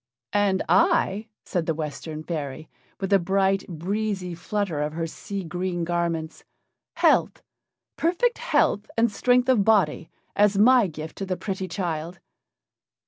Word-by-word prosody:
"And 200 -2 +2
I," 280 - +2 0.2
said 175 -4 -2
the 165 - 0
Western 155 0 -5
fairy, 155 -2 -5 0.3
with 195 0 -1
a 195 - +6
bright, 195 +2 +1
breezy 190 +2 -3
flutter 175 -2 -2
of 150 +1 -2
her 165 +1 -2
sea 195 +4 -6
green 175 +1 -3
garments, 165 -2 -2 0.5
"health - - +2 0.5
perfect 365 +9 +1
health 215 - +1
and 230 -1 +3
strength 250 +3 +2
of 250 -6 +4
body, 195 -7 +2 0.3
as 205 -1 +3
my 240 +1 +6
gift 155 -1 -8
to 195 - -3
the 185 -1 -2
pretty 190 -2 -4
child." 170 -1 -4
190 Hz, 140 wpm, -25 LUFS, 165-210 Hz, 0.5 s, a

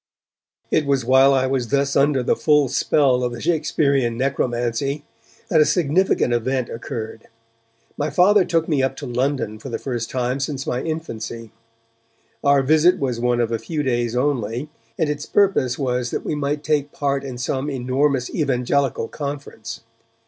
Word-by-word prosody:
It 150 - +2
was 135 -4 +1
while 130 +2 +6
I 130 -1 +2
was 130 -2 -1
thus 140 +2 0
under 140 -2 +3
the - - +2
full 150 -3 +3
spell 130 -1 +2
of 125 - -1
the 120 - -7
Shakespearean 140 -6 +1
necromancy 130 +2 -1 0.4
that 160 - +4
a - - +8
significant 170 -5 +2
event 125 +1 -1
occurred. 115 -1 -6 0.7
My 150 +1 0
Father 195 +4 +5
took 165 -2 0
me 150 -5 +1
up 130 - 0
to - - -7
London 125 -3 -1
for 135 - -8
the 115 - -3
first 120 -4 -4
time 125 +1 -1
since 140 -1 -3
my 125 - -2
infancy. 115 -8 -5 0.9
Our 140 -1 +4
visit 155 +5 +4
was 125 -4 -2
one 120 0 +1
of 115 -1 0
a 115 - -1
few 150 +7 -3
days 120 -3 0
only, 125 0 -1 0.3
and 160 - +1
its 150 0 -3
purpose 185 -11 +2
was 125 -3 -1
that - - -4
we - - -1
might 145 0 -2
take 150 -2 0
part 140 -1 -1
in 130 -3 -6
some 130 +3 -2
enormous 130 0 0
Evangelical 135 -3 0
conference. 140 -6 -6
135 Hz, 165 wpm, -21 LUFS, 125-145 Hz, 0.9 s, a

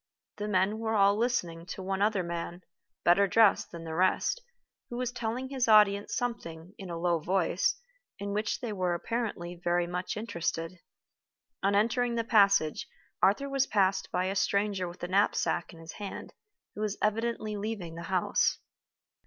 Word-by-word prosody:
The 210 - -3
men 205 +2 +1
were 225 0 -1
all 200 -1 +5
listening 180 -8 -1
to 190 - -6
one 195 +1 -2
other 205 -2 +2
man, 170 +1 -5 0.4
better 195 +4 +5
dressed 215 +1 +4
than 170 -1 -9
the 160 -1 -6
rest, 185 - +1 0.5
who 240 - -5
was 250 0 -1
telling 245 +2 -3
his 265 -3 0
audience 210 -2 +5
something, 180 -8 -4
in 190 -2 -7
a 170 - -4
low 170 0 +1
voice, 185 - +1 0.4
in 200 0 -4
which 210 +1 -1
they 230 -4 -3
were 180 -3 0
apparently 200 -3 -3
very 175 0 +2
much 180 +3 -4
interested. 170 -4 -3 0.8
On 200 +1 +2
entering 235 +3 +2
the 230 - 0
passage, 200 -8 +3 0.3
Arthur 215 +8 +3
was 275 -1 +1
passed 195 -2 +1
by 180 +1 0
a 190 +1 -2
stranger 200 -2 +1
with 175 +1 -10
a - - -1
knapsack 185 -2 +1
in 170 - -14
his 165 0 -9
hand, 205 -2 -7 0.4
who 210 - -7
was 210 -1 -1
evidently 215 0 -1
leaving 205 -5 -4
the 165 - -7
house. 185 -2 +2
200 Hz, 170 wpm, -29 LUFS, 175-220 Hz, 0.8 s, all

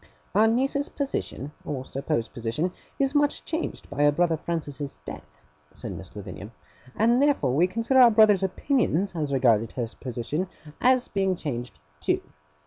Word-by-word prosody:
'Our 215 +3 +5
niece's 270 +5 +1
position, 270 - -3
or 130 -3 -4
supposed 130 -4 -2
position, 125 +8 -2 0.3
is 275 0 +1
much 290 -1 +1
changed 325 +1 -4
by 145 +1 -1
our 145 - +6
brother 165 +2 +2
Francis's 145 -4 -4
death,' 75 0 -9 0.4
said - - -5
Miss 95 +1 -9
Lavinia; 100 0 -8 0.5
'and 235 +4 +3
therefore 280 - +2
we 165 +6 +4
consider 230 +7 +2
our 245 -2 +9
brother's 215 -3 +5
opinions 195 - +1
as 150 -3 -2
regarded 115 -5 +3
her 120 - -1
position 130 +8 -3 0.3
as 255 0 +4
being 195 -2 0
changed 125 - -5 0.2
too. - - 0
165 Hz, 150 wpm, -26 LUFS, -, 0.5 s, our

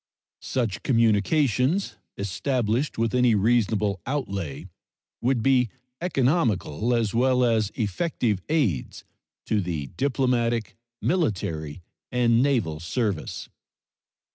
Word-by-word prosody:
Such 115 -7 -2
communications, 125 - +2 0.2
established 120 +6 -1
with 115 -1 0
any 125 -3 +4
reasonable 105 -3 +1
outlay, 100 - -3 0.5
would 125 -2 +1
be 130 -3 +3 0.3
economical 125 - +1
as 115 -3 0
well 125 +1 +3
as 110 -4 +2
effective 110 - -1
aids 130 - 0 0.4
to 105 -2 +1
the 80 -7 -4
diplomatic, 125 -4 0 0.3
military, 95 - -1 0.3
and 120 -1 +3
naval 115 - +1
service. 100 0 -2
115 Hz, 90 wpm, -25 LUFS, 100-130 Hz, 0.5 s, any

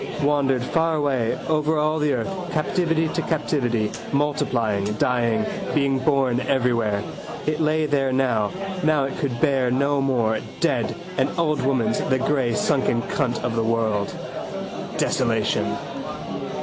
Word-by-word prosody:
Wandered 140 -3 +2
far 165 +3 +1
away 135 -6 0
over 155 0 +1
all 155 +1 +1
the 150 -1 +2
earth, 190 -2 -3
captivity 165 0 +1
to - - -1
captivity, 125 -8 0 0.2
multiplying, 125 -8 +1
dying, 120 - +1 0.3
being 140 -2 +2
born 130 -3 +2
everywhere. 120 -6 +1 0.4
It 155 0 0
lay 155 0 +2
there 140 -2 +1
now. 125 -5 +1 0.3
Now 155 -2 +3
it 135 - -3
could 125 -5 -2
bear 135 -4 +2
no 140 +3 +2
more. 115 -5 +1 0.2
Dead: 135 -9 +1 0.2
an - - +2
old 155 -3 +1
woman's: 140 +11 +1
the 160 -10 +1
grey 130 -3 +1
sunken 120 -2 +1
cunt 125 -5 -1
of 120 -2 -1
the 115 - +1
world. 110 -3 0 0.9
Desolation. - - +1
135 Hz, 135 wpm, -23 LUFS, 120-150 Hz, 0.9 s, Now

